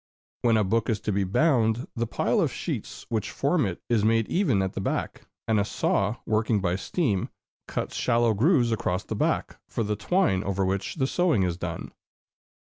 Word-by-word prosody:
When 115 Hz, -2 st, +3 dB
a 110 Hz, -, +3 dB
book 110 Hz, +4 st, 0 dB
is 110 Hz, -3 st, +1 dB
to 105 Hz, -, -1 dB
be 100 Hz, 0 st, +1 dB
bound, 115 Hz, -, +2 dB
the 115 Hz, -1 st, -1 dB
pile -, -, +1 dB
of -, -, +1 dB
sheets -, -, -5 dB
which 110 Hz, -2 st, -1 dB
form 145 Hz, -, +1 dB
it 90 Hz, -, -6 dB
is 115 Hz, -3 st, +2 dB
made 115 Hz, 0 st, +3 dB
even 135 Hz, -, +2 dB
at 95 Hz, -, -3 dB
the -, -, -3 dB
back, -, -, -3 dB, 0.2 s
and 110 Hz, -2 st, +3 dB
a -, -, +3 dB
saw, 105 Hz, +1 st, 0 dB
working 110 Hz, 0 st, +1 dB
by 90 Hz, -2 st, 0 dB
steam, 100 Hz, -, -1 dB, 0.4 s
cuts -, -, -3 dB
shallow 115 Hz, -1 st, +2 dB
grooves 120 Hz, -, +3 dB
across 95 Hz, -4 st, -1 dB
the -, -, -5 dB
back, -, -, -1 dB
for 115 Hz, -, -1 dB
the 105 Hz, 0 st, -1 dB
twine 105 Hz, -, +1 dB
over 95 Hz, 0 st, 0 dB
which 95 Hz, +1 st, -2 dB
the 135 Hz, -5 st, +1 dB
sewing 160 Hz, -, +2 dB
is 90 Hz, -2 st, 0 dB
done. 85 Hz, -2 st, -5 dB
110 Hz, 195 wpm, -26 LUFS, 100-120 Hz, 0.4 s, When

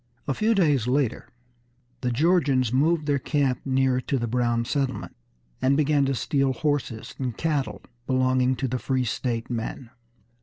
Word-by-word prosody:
A 135 Hz, -, +1 dB
few 220 Hz, +8 st, +1 dB
days 145 Hz, -, +2 dB
later 130 Hz, -2 st, 0 dB, 0.7 s
the 125 Hz, -, 0 dB
Georgians 140 Hz, -4 st, +2 dB
moved 155 Hz, +4 st, +2 dB
their 145 Hz, -2 st, +1 dB
camp 135 Hz, -2 st, 0 dB
nearer 130 Hz, -1 st, +2 dB
to 135 Hz, -, -1 dB
the 120 Hz, -, -1 dB
Brown 120 Hz, 0 st, 0 dB
settlement, 135 Hz, 0 st, -2 dB, 0.5 s
and 135 Hz, +2 st, +3 dB
began 150 Hz, -2 st, +3 dB
to 135 Hz, 0 st, 0 dB
steal 135 Hz, +1 st, +1 dB
horses 145 Hz, -7 st, -2 dB
and 125 Hz, -4 st, -3 dB
cattle 135 Hz, -11 st, -1 dB, 0.2 s
belonging 130 Hz, 0 st, +2 dB
to 130 Hz, +2 st, -2 dB
the 125 Hz, +1 st, -2 dB
free 130 Hz, 0 st, 0 dB
state 115 Hz, +1 st, -2 dB
men. 115 Hz, +1 st, -4 dB
130 Hz, 155 wpm, -25 LUFS, 125-145 Hz, 0.7 s, and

